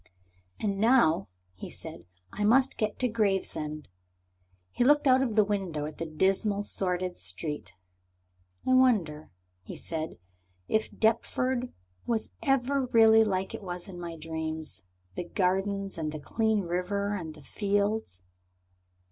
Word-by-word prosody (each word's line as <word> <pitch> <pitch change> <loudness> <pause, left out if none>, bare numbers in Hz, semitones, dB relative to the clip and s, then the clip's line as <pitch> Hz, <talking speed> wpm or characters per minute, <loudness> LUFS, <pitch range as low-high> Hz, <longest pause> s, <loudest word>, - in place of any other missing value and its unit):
"And 200 -2 -1
now," 220 - +4 0.3
he 90 - -8
said, - - -9 0.3
"I 210 - -2
must 260 +5 +3
get 215 -2 -1
to 255 - +1
Gravesend." 190 - -1 0.8
He - - +1
looked 295 +3 +4
out 260 -1 +5
of 240 -5 0
the 215 - +6
window 190 -7 -2
at 155 0 -8
the 165 - -3
dismal, 195 +5 +1
sordid 180 -2 -1
street. 150 - -4 0.9
"I 255 - +4
wonder," 205 -13 +3 0.3
he 90 - -9
said, 160 -1 -5 0.5
"if 220 0 +1
Deptford 245 +3 0 0.4
was 225 -2 -1
ever 270 0 +1
really 225 -1 +6
like 190 -3 -1
it - - -6
was 180 -1 -6
in 180 -3 -9
my 170 -1 -6
dream 160 0 -4 0.5
the - - -3
gardens 195 +1 -1
and 155 -1 -2
the 155 - -6
clean 220 +6 +1
river 195 +3 -1
and 160 -5 -6
the 150 - -13
fields?" 205 - -1
200 Hz, 140 wpm, -29 LUFS, 165-225 Hz, 0.9 s, the